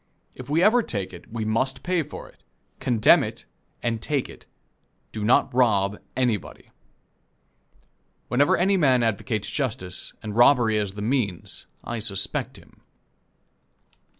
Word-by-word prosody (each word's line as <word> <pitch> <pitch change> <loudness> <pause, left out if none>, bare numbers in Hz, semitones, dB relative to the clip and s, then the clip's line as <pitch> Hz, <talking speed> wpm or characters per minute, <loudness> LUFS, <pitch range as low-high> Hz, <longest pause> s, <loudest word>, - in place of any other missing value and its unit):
If 130 +1 -10
we 160 +4 +2
ever 235 +4 +5
take 100 - -4
it, 85 - -13
we 110 -1 -3
must 130 +4 -1
pay 180 -2 +1
for 150 0 -8
it - - -21 0.4
condemn 115 -4 +4
it - - -7 0.4
and 115 -2 -1
take 140 +1 -1
it - - -14 0.6
do 110 - -5
not 120 +3 +3
rob 105 -5 +2 0.2
anybody. 120 -7 -2 1.6
Whenever 140 +4 +3
any 195 +3 +3
man 130 -7 +3
advocates 110 -1 -1
justice, 100 -10 -3
and 105 -1 -5
robbery 120 -3 +5
as 100 -2 -2
the 105 0 -6
means, 110 -7 -2 0.2
I 120 -1 -4
suspect 100 -3 -2
him. - - -20
120 Hz, 135 wpm, -24 LUFS, 105-135 Hz, 1.6 s, ever